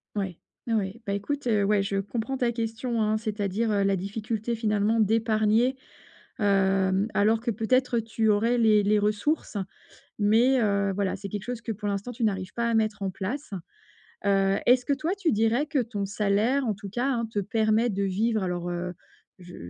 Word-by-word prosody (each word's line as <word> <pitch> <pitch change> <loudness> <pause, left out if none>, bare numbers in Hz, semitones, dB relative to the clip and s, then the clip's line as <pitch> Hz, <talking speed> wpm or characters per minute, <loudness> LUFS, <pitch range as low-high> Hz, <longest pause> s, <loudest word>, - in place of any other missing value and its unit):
Ouais. 190 -4 -3 0.3
Ouais, 230 - 0
ouais. 210 +2 -2
Bah 200 - -2
écoute, 250 +7 -3
heu, 210 -3 +2
ouais, 205 0 +3
je 195 0 -2
comprends 230 +6 -3
ta 245 -2 +1
question, 230 0 -2
hein, 215 0 +2
c'est-à-dire, 215 0 -2
heu, 200 -1 +2
la 195 0 +2
difficulté 215 +4 -3
finalement 215 0 +1
d'épargner, 220 +3 +2 0.6
hem, 195 0 +2
alors 220 +2 +3
que 240 - -2
peut-être 240 +3 +1
tu 225 0 -1
aurais 230 +4 +2
les 215 -3 +4
les 210 +1 +3
ressources, 210 +4 -1 0.6
mais 235 +6 +4
heu, 200 -2 +1
voilà, 200 -2 -1
c'est 200 0 -7
quelque 205 0 -5
chose 245 -1 -5
que 225 - -4
pour 210 0 -5
l'instant 200 +4 -3
tu 235 0 -5
n'arrives 190 -3 -1
pas 235 0 -1
à - - 0
mettre 215 -2 0
en 190 - -1
place. 225 +8 -5 0.7
Heu, 195 0 +3
est-ce 250 0 +4
que 285 - +2
toi, 315 +5 -2
tu 350 -5 +1
dirais 225 +6 +2
que 290 -4 0
ton 215 -5 -2
salaire 210 +7 +1
en 215 - +1
tout 200 -1 -9
cas, 245 +6 -1
hein, 235 -2 -1
te 205 - -1
permet 220 +3 +1
de 200 0 -1
vivre 210 +2 0
alors, 175 -1 -3
heu, 175 +1 -4 0.5
je 180 0 -12
215 Hz, 190 wpm, -26 LUFS, 200-235 Hz, 0.7 s, les